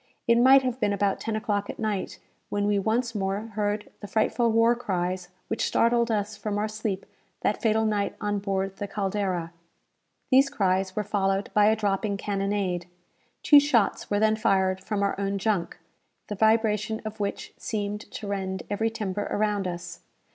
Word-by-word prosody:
It 235 0 +4
might 265 +2 +7
have 255 -1 -2
been 205 -4 +1
about 200 -1 0
ten 225 - -3
o'clock 205 -2 -1
at - - -5
night, 215 -4 -2 0.3
when 205 0 0
we 205 -1 +2
once 230 +3 0
more 195 -1 -1
heard 210 0 -2
the 205 - -8
frightful 230 +2 +1
war 230 +1 +4
cries 185 -5 -2 0.2
which 225 - -2
startled 235 0 +2
us 210 -1 -1
from 210 -1 -3
our 210 +1 0
sleep 215 -2 -3 0.4
that - - 0
fatal 220 -1 +2
night 210 -2 0
on 205 -1 -1
board 195 -1 -2
the 205 - -4
"Caldera." 190 -4 -2 0.8
These 270 +2 +6
cries 190 -6 0
were 210 - 0
followed 195 -1 0
by 210 0 +5
a 220 - +4
dropping 205 -1 -1
cannonade. 195 -3 -1 0.6
Two 290 - +8
shots 265 -7 +1
were 205 - +1
then 215 0 +3
fired 190 -3 +1
from 205 -1 -1
our 200 - +1
own 200 0 -1
junk, 195 -4 -1 0.5
the 210 - -3
vibration 220 0 +2
of 215 0 -6
which 200 -1 -3
seemed 210 -1 -3
to 215 - -7
rend 190 -1 -3
every 220 +2 +1
timber 205 -2 -3
around 205 -2 0
us. 175 0 -6
205 Hz, 175 wpm, -26 LUFS, 195-220 Hz, 0.8 s, Two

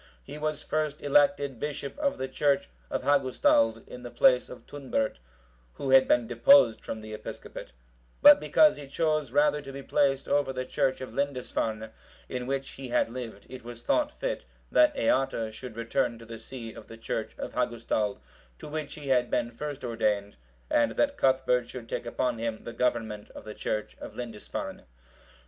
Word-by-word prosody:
He 150 - -9
was 155 0 -2
first 155 -1 -2
elected 145 -2 +3
bishop 145 -1 -4
of 285 -2 0
the 130 - -3
church 140 - +1 0.2
of - - -2
Hagustald, 145 - +3
in - - -9
the - - -7
place - - +4
of - - -11
Tunbert,(754) 130 - -2 0.6
who 135 - -3
had 135 0 +7
been 120 -1 +3
deposed 120 +1 +5
from 110 - -5
the 110 0 -8
episcopate; 110 - -8 0.5
but 290 0 +9
because 310 -1 +4
he 145 - -9
chose 155 -1 0
rather 150 +2 +3
to 135 - -9
be 135 0 -8
placed 135 -1 +1
over 145 -2 +2
the 130 -1 -3
church 130 +1 0
of 130 - -7
Lindisfarne, 125 -5 -2 0.4
in 125 -1 -4
which 135 0 -2
he 135 -1 -8
had 120 -1 +1
lived, 115 -4 -7
it 130 -1 -10
was 120 0 -9
thought 300 -1 +2
fit - - -2 0.3
that 305 -1 +5
Eata 135 - +1
should 115 +1 -8
return 115 +1 0
to 115 - -12
the 115 -1 -8
see 115 -1 -8
of - - -12
the 115 - -11
church 115 - -4
of - - -6
Hagustald, 110 -3 -1 0.4
to - - -9
which 150 -1 -5
he 145 -2 -7
had 125 -2 +3
been 120 - 0
first 145 +3 -6
ordained, 105 -4 0 0.3
and 300 -1 +2
that 285 -1 +1
Cuthbert 130 - +2
should 120 -3 -8
take 120 - -4
upon 125 -1 -1
him 115 -1 -3
the 115 - -7
government 115 -4 -1
of - - -9
the 105 - -7
church 105 0 -3
of - - -9
Lindisfarne. 115 -4 -6
130 Hz, 180 wpm, -28 LUFS, 115-145 Hz, 0.6 s, but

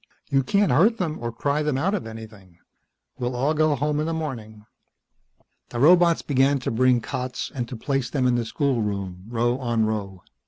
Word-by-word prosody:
You 135 - +4
can't 200 +9 +2
hurt 220 +9 +4
them 165 -6 -3
or 120 0 -3
cry 140 +5 -1
them 150 -3 0
out 185 +9 0
of 190 - -3
anything. 110 -5 -11 0.6
We'll 125 0 -2
all 140 +5 +1
go 155 -1 +2
home 150 +2 -1
in 155 - -1
the 165 - -1
morning." 110 -9 -6 1.0
The 120 - -5
robots 170 +3 +5
began 140 0 +2
to - - -2
bring 125 +1 +3
cots 125 0 -4
and 125 -3 -3
to 125 - -7
place 135 +1 -2
them 130 -1 0
in 125 - +3
the 120 -1 +1
schoolroom, 105 - -2
row 120 +2 0
on 120 -3 0
row. 100 -4 -4
125 Hz, 190 wpm, -24 LUFS, 115-150 Hz, 1.0 s, robots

